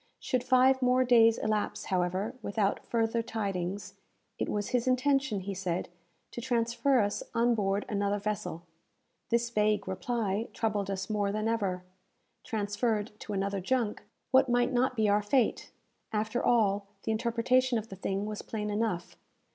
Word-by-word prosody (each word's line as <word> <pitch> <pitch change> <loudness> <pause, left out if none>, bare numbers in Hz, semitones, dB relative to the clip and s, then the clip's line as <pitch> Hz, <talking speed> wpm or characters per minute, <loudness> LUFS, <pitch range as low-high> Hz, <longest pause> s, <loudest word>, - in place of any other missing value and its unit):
Should 250 -2 -1
five 260 +1 +4
more 255 0 +4
days 230 -2 +5
elapse, 215 -1 -1
however, 185 +4 -1
without 200 -1 0
further 230 0 0
tidings, 200 -3 -3 0.5
it - - -1
was 205 -1 -2
his 245 0 0
intention, 260 -4 +2
he 195 +1 -4
said, 180 -2 -2 0.4
to 240 - -6
transfer 240 +2 +2
us 205 0 -1
on 235 +1 +3
board 200 -2 0
another 205 -1 0
vessel. 205 -5 -3 0.7
This 235 0 +1
vague 210 -2 +1
reply 205 +2 -1
troubled 205 -3 -1
us 190 -1 -3
more 205 -2 0
than 215 +1 -1
ever. 195 -5 -1 0.6
Transferred 210 +1 -1
to 210 - -6
another 195 0 -1
junk, 230 +1 0 0.3
what 265 -1 +5
might 245 +1 +2
not 255 +1 +2
be 220 -2 +2
our 205 +1 +3
fate? 235 +4 +1 0.4
After 220 +3 -1
all, 205 -4 +2 0.2
the - - -1
interpretation 235 +3 +2
of 220 +1 -5
the 195 - -7
thing 195 +1 -2
was 210 0 -4
plain 210 -1 -4
enough. 205 -5 -2
215 Hz, 155 wpm, -30 LUFS, 200-240 Hz, 0.7 s, days